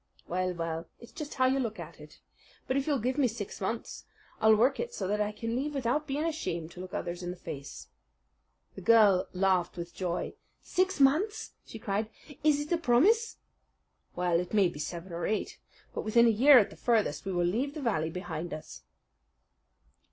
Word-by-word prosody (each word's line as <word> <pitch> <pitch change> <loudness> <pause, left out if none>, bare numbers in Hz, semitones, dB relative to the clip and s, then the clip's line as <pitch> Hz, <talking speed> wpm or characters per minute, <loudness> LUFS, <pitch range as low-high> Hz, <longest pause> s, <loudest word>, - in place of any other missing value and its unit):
"Well, 185 +1 -1
well, 165 0 -4
it's 235 - -13
just 300 -1 -7
how 260 - +3
you 265 +1 +2
look 225 -4 -3
at - - -9
it. - - -15 0.4
But 260 - -1
if 275 +1 0
you'll 290 -2 +2
give 255 +4 -1
me 270 - +4
six 220 -4 -6
months, 225 +4 -4 0.3
I'll 220 0 +6
work 250 +6 +3
it 475 0 -4
so - - -3
that 210 +2 0
I 210 0 0
can 230 +2 -4
leave 290 +3 -2
without 275 +3 0
being 285 +2 -1
ashamed 170 - -3
to 180 - -12
look 185 0 -7
others 175 +1 -4
in 175 - -4
the 180 - -6
face." 145 -5 -8 0.9
The - - -9
girl 205 -2 +5
laughed 185 -2 +1
with 170 0 -6
joy. 175 -2 -3 0.3
"Six 370 -2 0
months!" 315 +11 +2 0.2
she - - -8
cried. 215 0 -2 0.3
"Is 300 -2 +4
it 295 +2 -5
a 340 - +2
promise?" 365 - +3 0.8
"Well, 175 -1 +1
it 180 +4 -4
may 195 -4 +5
be 150 - -10
seven 170 +3 -5
or 170 0 -2
eight. 215 - -2 0.3
But - - -3
within 235 +2 +4
a - - +6
year 260 +6 +7
at 215 - +4
the - - -11
furthest 220 -11 +1
we 195 - -2
will 175 -1 +1
leave 250 +11 -1
the - - -4
valley 160 -10 0
behind 175 -1 -5
us." 155 - -10
215 Hz, 200 wpm, -30 LUFS, 180-270 Hz, 0.9 s, year